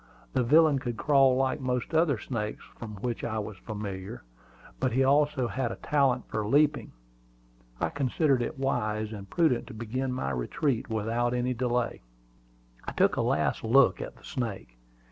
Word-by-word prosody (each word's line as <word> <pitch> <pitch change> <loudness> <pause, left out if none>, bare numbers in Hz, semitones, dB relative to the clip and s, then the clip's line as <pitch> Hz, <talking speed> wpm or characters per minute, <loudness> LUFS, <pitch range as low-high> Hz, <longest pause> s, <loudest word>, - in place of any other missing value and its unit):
The - - +2
villain 150 +3 +5
could 120 -3 -4
crawl 135 -3 +4
like 130 +2 +1
most 125 +1 -2
other 160 -5 +3
snakes 105 -2 -4 0.2
with 105 -4 -8
which 120 -2 -2
I 110 -1 -2
was 105 -2 -5
familiar, 105 0 -6 0.6
but 130 -3 0
he 130 +2 +3
also 140 -1 +3
had 125 -1 -2
a - - -4
talent 135 -4 +1
for 110 - -2
leaping. 145 +7 +2 0.9
I - - 0
considered 140 0 +1
it 120 - -3
wise 110 -5 -1
and 100 -2 -9
prudent 140 - +1
to 125 - -9
begin 125 +4 -3
my 125 - -2
retreat 115 - -1
without 115 +3 0
any 125 +1 0
delay. 125 0 -1 0.8
I - - -6
took - - +3
a - - 0
last - - 0
look 125 +4 +4
at - - -7
the - - -20
snake. 100 - -5
125 Hz, 165 wpm, -28 LUFS, 110-135 Hz, 0.9 s, villain